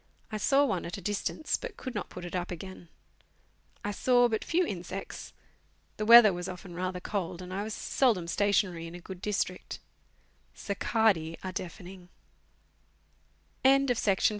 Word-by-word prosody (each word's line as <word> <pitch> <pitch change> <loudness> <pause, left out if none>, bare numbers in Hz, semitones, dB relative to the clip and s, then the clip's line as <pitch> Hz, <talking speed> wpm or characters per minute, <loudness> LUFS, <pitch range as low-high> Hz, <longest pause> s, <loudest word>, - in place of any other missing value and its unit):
I 215 - -2
saw 275 +7 +4
one 190 -9 -1
at 170 - -5
a - - -6
distance, 205 - -1
but - - -8
could 255 - -6
not 205 -4 -4
put 180 - -8
it 175 - -6
up 180 -1 -2
again. 180 0 -8 1.0
I 205 - 0
saw 245 +4 +4
but 220 -2 -1
few 350 +2 +2
insects. 185 - -6 0.7
The 215 - -2
weather 230 -3 +10
was 180 +1 -4
often 180 0 -8
rather 180 +1 -3
cold, 180 -3 -3
and 185 0 -7
I 195 - -2
was 215 0 -4
seldom 220 -11 +1
stationary 185 -3 +1
in 165 - -9
a - - -8
good 185 +1 -9
district. 190 -2 -2
190 Hz, 140 wpm, -30 LUFS, 180-215 Hz, 1.0 s, weather